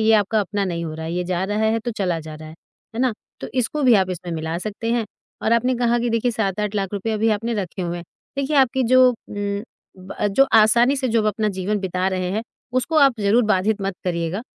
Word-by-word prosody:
ये 220 0 +4
आपका 215 +1 +2
अपना 200 0 -2
नहीं 170 -3 -3
हो 155 -1 -5
रहा 160 0 -6
है, 165 - -4
ये 180 0 -1
जा 180 0 -1
रहा 205 +2 -2
है 220 +1 +2
तो 230 +2 -4
चला 185 -6 -1
जा 155 0 -9
रहा 155 0 -10
है, 155 - -11 0.4
है 230 - -2
ना? 255 -3 +2 0.3
तो - - -5
इसको 260 +4 -1
भी 250 -3 +6
आप 190 -3 +2
इसमें 175 -1 -5
मिला 160 +1 -3
सकते 215 +4 -4
हैं। 235 -2 0 0.4
और 220 - +2
आपने 250 +2 +2
कहा 240 0 +1 0.2
कि 245 - +2
7-8 210 -1 -2
लाख 195 -1 -2 0.2
अभी 220 +1 +1
आपने 225 +3 -1
रखे 190 -2 -4
हुए 175 0 -3
हैं 170 - -8 0.3
देखिए, 280 +2 0
आपकी 265 -1 +3
जो 255 +2 +6
उम, 205 -3 -4 0.4
ब 185 +2 -3
जो 270 +7 +4
आसानी 235 +5 +5
से 265 -1 -1
जो 230 -1 +2
अपना 215 +1 0
जीवन 195 +1 -2
बिता 185 0 -1
रहे 185 -1 -2
हैं, 215 +3 -1 0.3
उसको 255 +6 0
आप 275 -3 +5
ज़रूर 205 +4 +3
बाधित 210 0 +1
मत 195 0 -2
करिएगा। 170 +3 -2
210 Hz, 235 wpm, -22 LUFS, 185-235 Hz, 0.4 s, भी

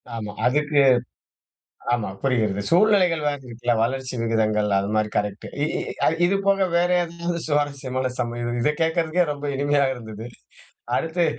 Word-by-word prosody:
ஆமா 105 -2 -5
அதுக்கு, 145 +2 +3 1.1
ஆமா 115 -5 -1
புரிகிறது. 110 -7 0
சூழ்நிலைகள் 180 -3 +4
வே 145 - +2 0.2
இருக்குல்ல. 120 0 -1
வளர்ச்சி 130 +2 -2
விகிதங்கள் 110 -2 +1
அது 100 +1 0
மாரி 110 0 +1
கரெக்ட்டு 105 0 -2 0.2
இ - - +3 0.6
இது 190 +3 +2
போக 195 -1 +3
வேற 175 +1 +2
எதாவது 170 0 -4
சுவாரஸ்யமான 140 -4 -1
சம 120 -1 -2 0.2
இத 150 - +3
கேட்கறதுக்கே 165 +1 +1
ரொம்ப 145 0 -6
இனிமையா 145 0 +2
இருந்தது. 110 -2 -9 0.7
அடுத்து, 165 +1 0
140 Hz, 130 wpm, -23 LUFS, 115-165 Hz, 1.1 s, சூழ்நிலைகள்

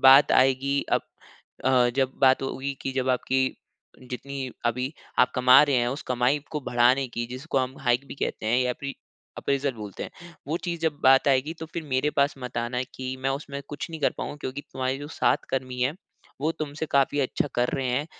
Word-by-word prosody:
बात 135 +2 +8
आएगी 135 +2 +3
अब - - +4 0.6
अ, 130 -2 +4
जब 130 -1 +2
बात 130 -1 +5
होगी 135 +1 -3
कि 135 - -2
जब 130 0 -1
आपकी 130 +1 +1 0.7
जितनी 135 +1 -5 0.2
अभी 125 +4 -1 0.3
आप 125 - +5
कमा 125 +3 +7
रहे 145 -3 +2
हैं 120 -1 +2
उस 135 +4 -4
कमाई 125 +3 +2
को 150 - -3
बढ़ाने 125 +2 +4
की 120 0 -3
जिसको 135 +3 -2
हम 130 0 -1
हाइक 125 +1 +1
भी - - -7
कहते 110 - -3
हैं 120 +3 +3
या 125 - +1
फिर, 140 -1 -4 0.4
अप्रेज़ल 140 0 0
बोलते 105 -3 -7
हैं 175 0 -10
वो 160 - 0
चीज़ 170 -2 -3
जब 160 -3 0
बात 135 +1 +6
आएगी 135 +4 +2
तो 160 - -5
फिर 170 - -2
मेरे 140 +3 +2
पास 140 +1 +3
मत 125 -1 -7
आना 125 +1 -2
की 130 0 -4
मैं 135 +1 -1
उसमें 140 -1 -7
कुछ 145 +3 -6
नहीं 160 - -6
कर 140 - +3
पाऊँगा - - -4
क्योंकि 130 +2 -4
तुम्हारे 130 0 -1
जो 145 +1 -7
साथ - - +2
कर्मी 130 -1 -2
है 135 +4 +1 0.5
वो 155 - +1
तुमसे 155 0 -4
काफ़ी 140 +1 +3
अच्छा 135 +2 0
कर 120 0 +2
रहे 135 -2 -1
हैं। 135 +5 0
135 Hz, 210 wpm, -26 LUFS, 125-140 Hz, 0.7 s, बात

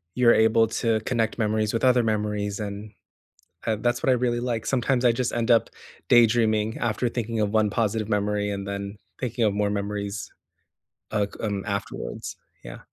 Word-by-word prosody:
you're 125 -2 +5
able 110 0 +4
to 110 0 0
connect 115 -1 -1
memories 110 -1 0
with 115 - -1
other 125 -1 +4
memories, 105 -2 -1
and, 105 0 -6 0.8
uh, 110 - +2
that's 120 0 0
what - - +2
I - - +6
really 120 -1 0
like. 120 -3 -2
Sometimes 125 -1 +1
I 120 - +6
just 125 +1 -2
end 120 0 +1
up 115 - +4 0.4
daydreaming 110 -2 +4
after 120 +1 0
thinking 115 -1 -3
of 105 -1 0
one 110 -1 +2
positive 110 0 -1
memory 105 0 0
and 100 -1 -4
then 100 +1 -5 0.2
thinking 120 -1 -2
of 105 - +2
more 105 0 0
memories, 100 0 -3 0.8
uh, 105 -1 +1
c - - -12
um, 100 -2 -3
afterwards. 100 -1 -5 0.3
Yeah. - - -8
110 Hz, 175 wpm, -25 LUFS, 105-120 Hz, 0.8 s, I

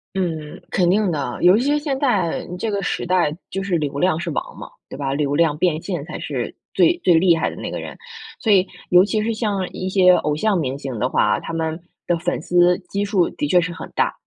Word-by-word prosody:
嗯， 160 -5 -3
肯 180 -2 +1
定 200 +1 +2
的， 140 -5 -3
尤 180 +4 +6
其 245 - 0
是 295 +1 +2
现 280 -3 -2
在， 205 - 0
嗯， 180 - -6
这 225 - -2
个 200 -2 -2
时 - - -2
代 175 -4 +1
就 195 - -3
是 180 -4 0
流 140 -2 -3
量 170 0 +1
是 170 -1 -4
王 - - -4
嘛， - - -9 0.2
对 - - -9
吧？ 135 -1 -3
流 145 0 0
量 155 -2 +2
变 160 -2 +1
现 175 -7 -4
才 - - -7
是 - - -4 0.2
最 345 - +4
最 175 - +5
厉 170 0 +5
害 - - 0
的 - - -9
那 - - -6
个 - - -4
人。 - - -8 0.4
所 220 -4 +3
以 190 -1 +4 0.2
尤 180 0 +7
其 215 +1 -1
是 225 0 -1
像 205 -4 -1
一 185 - -4
些 185 -1 +5
偶 150 -2 -1
像 210 +5 +1
明 135 -5 -1
星 135 -6 -6
的 125 - 0
话， - - +2
他 - - -7
们 160 0 -2 0.3
的 175 - +1
粉 175 +1 -2
丝 175 0 +4
基 200 +1 -2
数 200 -4 +2
的 145 - -3
确 180 +3 +4
是 175 0 -2
很 - - -9
大， - - +1
180 Hz, 265 characters per minute, -21 LUFS, 155-195 Hz, 0.4 s, 尤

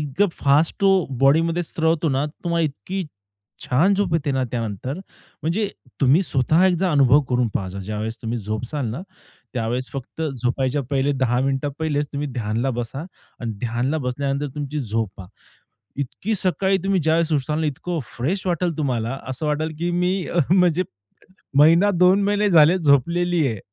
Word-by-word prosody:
इतकं 150 +7 +1
फास्ट 145 +3 +2
तो 195 -2 +4 0.2
बॉडी 140 +4 +5
मध्ये 170 +1 0
स्त्रवतो 160 0 0
ना 135 +2 +1
तुम्हाला 170 +2 -2
इतकी 160 - -4 0.6
छान 170 +11 +3
झोप 190 -4 0
येते 145 -3 0
ना 130 0 0
त्यानंतर 115 +2 -3 0.5
म्हणजे 195 +6 0 0.3
तुम्ही 140 +7 +5
स्वतः 155 +6 +2
एकदा 180 0 +1
अनुभव 140 0 +5
करून 125 -2 +2
पहा 95 0 -3
ज्यावेळेस 110 +3 -4
तुम्ही 115 +1 -2
झोपसाल 115 +6 -3
ना 125 - -5 0.5
त्यावेळेस 120 +2 -2
फक्त 135 +4 -6
झोपायच्या 130 0 -1
पहिले 140 +1 +1
10 130 -2 +1
मिनिट 135 +1 0
पहिले 150 -2 0
तुम्ही 145 +1 -2
ध्यानला 115 +2 -1
बसा 120 +3 -4 0.4
आणि 115 -2 -3
ध्यानला 120 +6 -1
बसल्यानंतर 140 +2 -2
तुमची 145 0 -3
झोपा. 105 -5 -3 0.7
इतकी 140 - -3
सकाळी 190 +1 +2
तुम्ही 195 -1 +2
ज्यावेळेस 160 +1 +2
उठताल 150 +2 0
ना 160 - 0
इतकं 160 +4 -3 0.2
फ्रेश 180 +11 -1
वाटेल 175 -2 0
तुम्हाला 125 -3 -1
असं 130 +4 -3
वाटेल, 155 +1 -1
की 175 +1 -1
मी 180 +1 0
अ, 175 - 0
म्हणजे 180 -2 +4 0.8
महिना 165 +7 +6
दोन 185 +2 +5
महिने 205 0 +2
झाले 165 +1 +6
झोपलेली 170 +2 +2
आहे. 110 - -3
145 Hz, 155 wpm, -22 LUFS, 125-170 Hz, 0.8 s, महिना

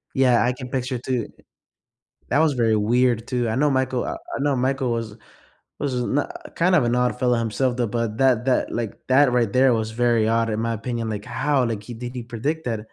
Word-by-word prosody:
Yeah, 125 -3 +4
I 125 +1 +1
can 125 -1 -8
picture 130 -1 -2
it, 120 - -6
too 125 -4 -1 1.0
that 145 - +2
was 160 -3 +3
very 115 -3 +2
weird, 120 +1 +1
too. 120 -2 -1
I 110 - -1
know 145 +2 +3
Michael 130 -2 0
I - - -3
I - - -7
know 140 -1 +1
Michael 130 0 0
was 115 -2 -4 0.6
was 140 -3 -2
no 145 +4 0 0.3
kind 180 +2 +2
of 145 - +4
an 120 +1 +1
odd 125 0 +1
fellow 125 -2 +2
himself, 120 +3 -1
though, 120 - +1
but 115 -1 -2
that 130 -3 +3
that 130 - +1
like, 115 -3 -3
that 130 0 +5
right 120 -4 +1
there 130 0 +5
was 110 -1 -1
very 120 -1 +2
odd, 115 0 +1
in 110 0 -2
my 115 0 -1
opinion, 115 0 -3
like, 105 0 -5
how, 135 +2 0
like, 110 -3 -3
he 120 - -8
did 120 +2 -7
he 120 - -4
predict 130 +7 -3
that? 115 -3 -2
125 Hz, 230 wpm, -23 LUFS, 115-130 Hz, 1.0 s, that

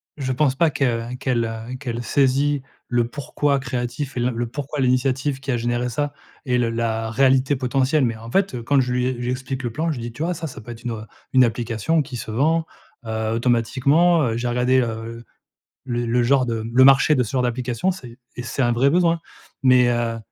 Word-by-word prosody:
je 130 -3 -3
pense 135 0 +1
pas 165 +2 +3
que 120 -4 -1
qu'elle, 125 -2 0
heu, 115 +2 -6
qu'elle 120 -4 -4
saisit 140 +2 +2 0.3
le 120 -1 +1
pourquoi 145 +1 -1
créatif 130 +2 -4
et 120 - -1
l 125 +1 +1
le 120 +1 -2
pourquoi 145 +3 -5
l'initiative 130 +2 +1
qui 135 0 -3
a 120 - +1
généré 120 +1 -1
ça 145 +4 -2 0.3
et 125 -1 +1
le 120 -2 +1
la 115 -1 -1
réalité 135 +3 +3
potentielle. 130 +2 +1
Mais 115 - -1
en 115 +1 -10
fait, 195 -9 +1
heu, 120 - -5
quand 140 +3 +3
je 125 -1 0
lui 125 0 +1
e - - +1
je 120 - -4
lui 125 - 0
explique 130 +1 -4
le 120 - -2
plan, 160 +7 -1
je 145 - -4
lui 115 - -6
dis: 120 - -5
«Tu 145 +7 -4
vois 180 +1 0
ça 160 0 -5
ça 125 - -9
peut 120 - -9
être 115 0 -11
une, 120 - -3
heu, 110 -1 -5 0.3
une 130 -1 +7
application 120 +6 0
qui 130 -3 -7
se 110 -2 -6
vend, 160 +7 +1 0.4
heu. 110 0 -2
Automatiquement, 130 +8 +3
heu, 115 -2 0
j'ai 120 +1 -2
regardé 125 +2 +2
heu, 115 0 -4 0.6
le 120 -2 -2
le 120 +1 +1
genre 130 +1 +3
de 115 -2 -2
m 115 +1 -6
le 130 +1 +7
marché 135 +3 +6
de 130 - +2
ce 110 - -5
genre 130 -2 0
d'application 125 +5 -1
c'est 125 -9 -8 0.2
et 125 - -4
c'est 130 +2 -2
un 120 0 +2
vrai 130 +4 +3
besoin». 170 0 +2 0.4
Mais, 125 -1 +5
heu, 120 -1 0
125 Hz, 235 wpm, -22 LUFS, 120-135 Hz, 0.6 s, une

